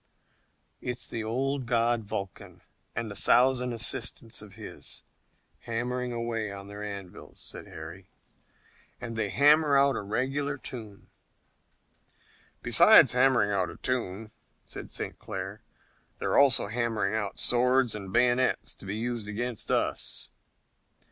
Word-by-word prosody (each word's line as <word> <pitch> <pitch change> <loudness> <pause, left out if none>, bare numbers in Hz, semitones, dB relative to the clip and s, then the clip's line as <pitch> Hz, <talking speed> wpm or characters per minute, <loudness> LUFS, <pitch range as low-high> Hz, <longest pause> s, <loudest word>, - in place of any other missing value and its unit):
"It's 125 -1 -2
the 115 - -4
old 130 +3 -1
god 115 -2 +1
Vulcan 100 -1 -6 0.3
and 115 -2 -3
a - - -7
thousand 125 +3 +3
assistants 115 -1 0
of 105 -2 -12
his - - -8 0.6
hammering 125 +2 -3
away 115 -3 -2
on 100 0 -8
their 100 +1 -8
anvils," 100 -3 -8
said - - -7
Harry, 85 +4 -9 0.9
"and 120 -2 -6
they 110 -2 -1
hammer 145 - +5
out 140 0 +4
a - - -2
regular 135 +7 -1
tune." 110 -7 -10 1.5
"Besides - - +7
hammering 125 -4 +3
out 95 -3 0
a - - -10
tune," 110 -4 -2 0.3
said - - -8
St. - - -6
Clair, - - -6 0.6
"they're - - -1
also 135 -5 +5
hammering 110 -2 -1
out 105 -2 -2
swords 125 0 +3
and 100 -3 -7
bayonets 125 +3 +2
to 100 - -13
be 100 - -3
used 115 -2 -3
against 115 +2 -4
us." - - -1
115 Hz, 130 wpm, -28 LUFS, 105-125 Hz, 1.5 s, Besides